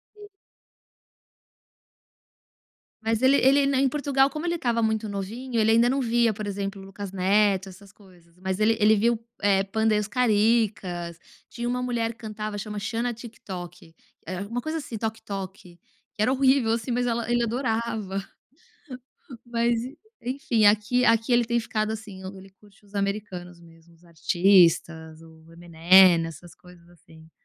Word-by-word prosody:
Sim. 415 0 -13 2.7
Mas 225 +1 -1
ele 265 +2 +5
ele 275 +1 +4
em 275 -1 +2
Portugal 275 -1 +1
como 305 +4 -5
ele 345 - 0
estava 235 -8 -1
muito 220 0 0
novinho, 225 +5 -5
ele 220 0 +3
ainda 230 +2 +4
não 275 +1 0
via 235 -2 +2
por 210 0 -6
exemplo 200 0 -4
o - - -11
Lucas 195 0 -8
Neto, 195 0 +2
essas 190 +1 -15
coisas, 175 -4 -22
mas 190 +1 -3
ele 220 +1 +3
ele 215 +1 +5
viu, 230 +2 +2 0.2
eh, 195 -1 +3
Panda 220 +2 0
e - - +2
os 210 0 -3
Caricas, 210 -7 0 0.3
tinha 240 0 -4
uma 250 +1 -2
mulher 235 -2 -1
que 230 - -23
cantava 215 -2 -6
chama 210 0 -5
Xana 230 +4 -2
Tik 230 0 -12
Tok, 175 -3 -9 0.3
eh, 175 - -5
era 185 - -4
alguma 230 +4 -4
coisa 315 +5 -4
assim 260 -6 -7
Toc 220 +1 -4
Toc, 195 -2 -5
que 175 -3 -18 0.4
era 215 +5 +2
horrível 265 -3 +3
assim, 230 +1 -3
mas 245 +1 0
ela 235 -1 -2
ele 240 0 +2
adorava, 225 -5 -2 1.2
mas 235 -1 0
en 265 +5 -9 0.3
enfim 245 -4 +1
aqui 215 +4 +3
aqui 230 +1 +2
ele 240 0 +4
tem 235 +1 0
ficado 215 -2 -2
assim, 210 -4 -9
ele 190 0 -13
curte 200 +1 -24
os 200 0 -22
americanos 195 -3 -4
mesmo, 165 0 -19
os 165 +1 -25
artistas, 170 -1 +2
o 160 0 -17
Eminem, 170 +1 +5
essas 165 +2 -11
coisas 175 -1 -18
assim. 160 -2 -19
215 Hz, 165 wpm, -25 LUFS, 190-235 Hz, 2.7 s, ele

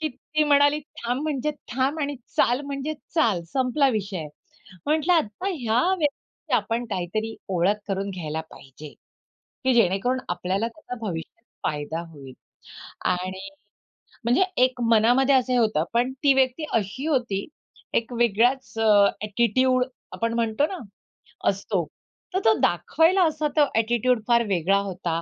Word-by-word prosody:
की 310 - 0
ती 305 +3 -2
म्हणाली, 285 0 +4 0.3
"थांब 245 +4 -1
म्हणजे 300 -2 -1 0.2
थांब 270 +5 0
आणि 285 -1 -1 0.2
चाल 245 +4 +3
म्हणजे 280 +2 -3 0.2
चाल," 215 - +2
संपला 265 +2 +2
विषय. 195 -8 -3 0.6
म्हटलं 310 +3 +2
आता 320 - -1
ह्या 235 -4 +1 0.2
व्यक्तीची 295 -2 -4
आपण 235 +1 -1
काहीतरी 210 +5 -2
ओळख 190 +3 +2
करून 195 +1 -2
घ्यायला 160 -4 -4
पाहिजे, 135 +3 -12 0.8
की 260 - +4
जेणेकरून 230 +4 +2
आपल्याला 190 +5 -1
त्याचा 250 +1 -9
भविष्यात 175 +6 -6 0.2
फायदा 150 +2 -2
होईल 135 -4 -11 0.8
आणि 185 +2 -4 0.8
म्हणजे 245 +11 +3 0.2
एक 255 -1 +1
मनामध्ये 245 +5 +4
असं 255 -1 +2
होतं 215 -9 +2
पण 245 +2 +2
ती 280 - +6
व्यक्ती 265 +3 +1
अशी 225 +6 -1
होती, 240 -9 0 0.5
एक 235 +2 0
वेगळाच 240 +1 +2
अ, 225 - +2 0.4
ॲटिट्यूड 250 +4 +2 0.3
आपण 230 0 -1
म्हणतो 230 +3 +1
ना, 380 - -6 0.7
असतो - - -1 0.5
तर 375 - +2
तो 220 - +6
दाखवायला 325 - +3
असा 310 -1 -1
तो 295 - +6
ॲटिट्यूड 235 +1 +2
फार 235 -1 +4
वेगळा 190 +1 +2
होता 175 -3 -3
235 Hz, 135 wpm, -24 LUFS, 195-270 Hz, 0.8 s, ती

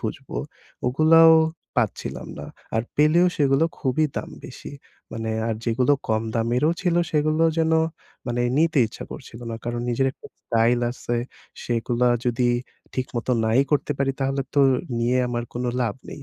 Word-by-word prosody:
খুঁজবো, - - -5 0.5
ওগুলাও 160 +5 +6 0.4
পাচ্ছিলাম - - -2
না। - - -7 0.3
আর 110 - +2
পেলেও 155 +4 +5
সেগুলো 140 +1 +3
খুবই 135 +3 +1
দাম - - -4 0.2
বেশি। 125 - -10 0.4
মানে 115 0 -3 0.2
আর 115 - 0
যেগুলো 125 +4 +2 0.2
কম 110 0 +1
দামেরও 120 +6 +2
ছিল, 175 -2 +1 0.2
সেগুলো 155 +2 +2
যেন 160 0 +2 0.5
মানে 120 0 -1 0.2
নিতে 160 -1 +3
ইচ্ছা 110 - -9
করছিলো 120 +2 -10
না। 115 - -4
কারণ, 120 0 -2
নিজের 135 +3 +1
একটা - - -14 0.2
স্টাইল 115 +1 +2
আছে, 120 -1 -3 0.5
সেগুলা 120 +1 +1 0.2
যদি 120 0 +2 0.5
ঠিকমতো 130 -1 -2
নাই 115 +4 +4
করতে 145 0 +1
পারি, 135 0 +1
তাহলে 135 +1 0
তো 145 - +4 0.4
নিয়ে 120 +2 +1
আমার 120 -1 -2
কোনো 125 +1 -2
লাভ 115 -4 -1 0.2
নেই। 145 - -9
125 Hz, 150 wpm, -23 LUFS, 120-150 Hz, 0.5 s, ওগুলাও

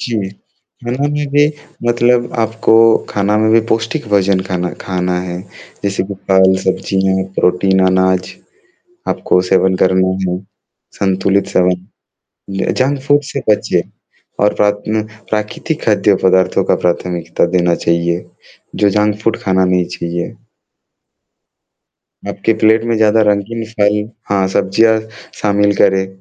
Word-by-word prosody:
जी। 110 -6 -2 0.6
खाना 125 +4 -1
में 150 0 -2
भी 145 0 +5 0.4
मतलब 120 0 +2
आपको 110 0 0 0.4
खाना 105 +1 0
में 110 0 +2
भी 115 - +5
पौष्टिक 115 +4 -1
भोजन 100 -2 +2
खाना 90 -1 -2
खाना 90 -1 -2
है, 90 0 -5 0.4
जैसे 100 -1 0
कि 100 - -6
फल, 95 0 +5
सब्ज़ियाँ, 95 0 0
प्रोटीन, 95 +1 +2
अनाज, 95 0 +1 0.8
आपको 90 - +1
सेवन 95 0 +3
करना 95 0 +3 0.2
है, 90 - -2 0.6
संतुलित 95 0 +1
सेवन, 90 0 +3 0.8
ज 95 0 -2
जंक 135 +2 +1
फूड 145 0 +4
से - - -3
बचिए। 105 - +1 0.6
और 105 - +2
रात 105 0 +1
में 110 0 0 0.3
प्राकृतिक 110 +9 -3
खाद्य 105 -2 +3
पदार्थों 95 -1 +2
का - - +2
प्राथमिकता 85 -1 0
देना 85 -1 +2
चाहिए, 85 +1 0 0.5
जो 105 - +3
जंक 105 0 +1
फ़ूड 115 - +1
खाना 95 -1 +2
नहीं 90 -1 +1
चाहिए। 85 0 -4 1.9
आपके 100 +2 0
प्लेट 110 +1 +4
में 115 - 0
ज़्यादा 110 0 +3
रंगीन 105 +3 -2
फल 105 0 +3 0.3
हाँ, 100 -1 +2
सब्जियाँ 110 +4 +2 0.4
शामिल 105 0 +2
करें, 95 0 +3
100 Hz, 130 wpm, -15 LUFS, 95-110 Hz, 1.9 s, भी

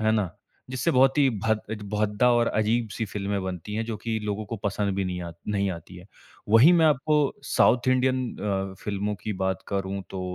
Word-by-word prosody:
है 110 0 +2
ना? 105 -5 0 0.4
जिससे 130 +6 0
बहुत 135 0 +4
ही 140 -2 +5 0.2
भद्द 110 -1 +2
अ, - - -1 0.2
भद्दा 105 +3 +2
और 120 -1 +3
अजीब-सी 110 0 0
फ़िल्में 100 -1 -3
बनती 95 +2 -5
हैं 110 +1 -1
जो 115 -2 -4
कि 110 +1 -3
लोगों 105 +1 -2
को 115 - -4
पसंद 100 -1 0
भी 95 0 -1
नहीं 90 -1 -3
आ 85 - -6 0.2
नहीं 100 -2 0
आती 85 +1 -9
हैं। 90 +2 -12 0.4
वही 115 +10 +7
मैं 165 -2 +5
आपको 150 +1 +2 0.3
साउथ 120 +1 +3
इंडियन 130 0 +2 0.2
अ, 95 -2 -2
फ़िल्मों 105 0 -2
की 110 - -2
बात 95 0 -1
करूँ 100 0 -2
तो 95 - -5
105 Hz, 205 wpm, -26 LUFS, 100-120 Hz, 0.4 s, वही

